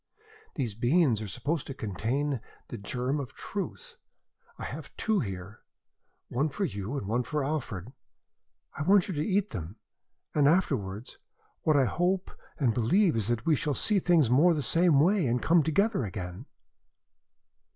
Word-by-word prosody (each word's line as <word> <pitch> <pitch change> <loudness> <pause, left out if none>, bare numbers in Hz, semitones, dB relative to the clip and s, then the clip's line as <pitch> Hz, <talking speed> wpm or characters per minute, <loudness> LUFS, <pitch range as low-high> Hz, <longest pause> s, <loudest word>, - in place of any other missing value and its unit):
These 120 -7 -2
beans 120 - +2
are 110 - -4
supposed 150 - -2
to 135 - -6
contain 120 +6 -2 0.3
the 120 - -5
germ 125 +8 -2
of 130 -5 -7
Truth. 470 - -6 0.6
I - - -7
have - - -6
'two 220 -2 +1
here 95 0 -5 0.7
one 140 +6 0
for 195 +7 -2
you 105 - -4
and 100 - -4
one 115 +4 +1
for 150 +3 -2
Alfred. 125 - -4 0.8
I - - -5
want 190 +4 +4
you 190 - -3
to 150 -1 -1
eat 200 +1 0
them, 90 -2 -6 0.6
and 145 -2 +4
afterwards, 125 - 0 0.4
what 155 - +2
I 135 - +4
hope 180 +7 0 0.3
and 125 -6 +2
believe 160 - +3
is 110 -3 0
that 120 -1 -1
we 160 - +4
shall 145 +1 -1
see 210 -2 +2
things 170 -6 +4
more 165 +7 +5
the 150 - -2
same 165 +3 +4
way 180 0 +3
and 120 +1 +1
come 165 +6 +4
together 195 - +1
again." 95 +3 -6
140 Hz, 160 wpm, -29 LUFS, 115-170 Hz, 0.8 s, more